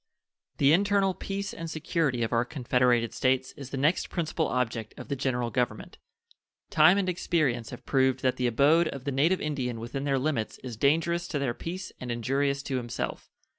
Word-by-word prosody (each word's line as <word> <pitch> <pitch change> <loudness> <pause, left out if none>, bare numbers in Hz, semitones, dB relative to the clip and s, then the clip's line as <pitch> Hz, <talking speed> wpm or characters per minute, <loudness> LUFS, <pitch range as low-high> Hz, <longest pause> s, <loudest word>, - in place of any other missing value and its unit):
The 140 +2 +5
internal 200 +1 +3
peace 200 +2 -4
and 165 0 -6
security 155 -6 0
of 115 - -2
our 115 0 +3
confederated 125 -3 +1
States 130 0 +1
is 140 -2 -10
the 135 - -4
next 150 +6 +1
principal 165 -2 -1
object 115 -3 -2
of - - -9
the 140 - 0
General 125 -3 -1
Government. 120 -4 -2 0.7
Time 190 - +6
and 195 -2 0
experience 155 -10 0
have - - -10
proved 130 -1 +2
that 130 -1 +1
the 125 - +1
abode 145 +8 +4
of 135 -4 -6
the 140 - -2
native 155 +8 +2
Indian 130 -6 -2
within 120 +4 -4
their 140 -1 +2
limits 130 -5 -1
is 125 -3 -6
dangerous 165 +7 +1
to 155 - -2
their 140 -4 -1
peace 180 +8 -6
and 125 -1 -5
injurious 135 +4 0
to 135 -2 -2
himself. 120 -1 -4
135 Hz, 185 wpm, -28 LUFS, 125-160 Hz, 0.7 s, Time